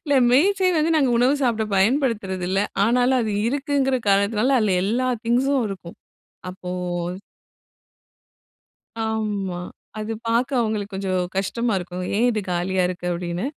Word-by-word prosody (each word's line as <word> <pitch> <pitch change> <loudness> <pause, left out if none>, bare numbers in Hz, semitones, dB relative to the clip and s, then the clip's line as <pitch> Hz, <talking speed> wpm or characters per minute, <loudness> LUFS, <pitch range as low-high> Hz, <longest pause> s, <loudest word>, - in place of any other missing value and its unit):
இல்ல 285 -3 +1 0.2
மேஜை 375 +8 +3
வந்து 310 +1 +2
நாங்க 275 -5 +3
உணவு 250 +4 +4
சாப்பிட 225 -4 +1
பயன்படுத்துறதில்ல. 195 -5 +1 0.3
ஆனாலும் 250 +3 +3
அது 220 -2 -1 0.2
இருக்குங்கிற 275 -1 0
காரணத்தினால 210 +6 +3
அதில் 200 -5 +2
எல்லா 240 +6 0 0.2
திங்க்ஸும் 255 +2 +2
இருக்கும். 185 -3 -8 0.5
அப்போ 180 0 -8 2.4
ஆமா 210 -5 -2 0.4
அது 215 +1 -3 0.2
பாக்க 235 +2 +1
அவுங்களுக்கு 215 -3 -2
கொஞ்சம் 190 -1 -1 0.2
கஷ்டமா 220 +5 -1
இருக்கும். 180 0 -6
ஏன் 235 +4 +3
இது 220 -3 -1
காலியா 180 +2 0
இருக்கு? 180 -1 -5
அப்படின்னு. 175 +4 -3
220 Hz, 125 wpm, -22 LUFS, 190-255 Hz, 2.4 s, உணவு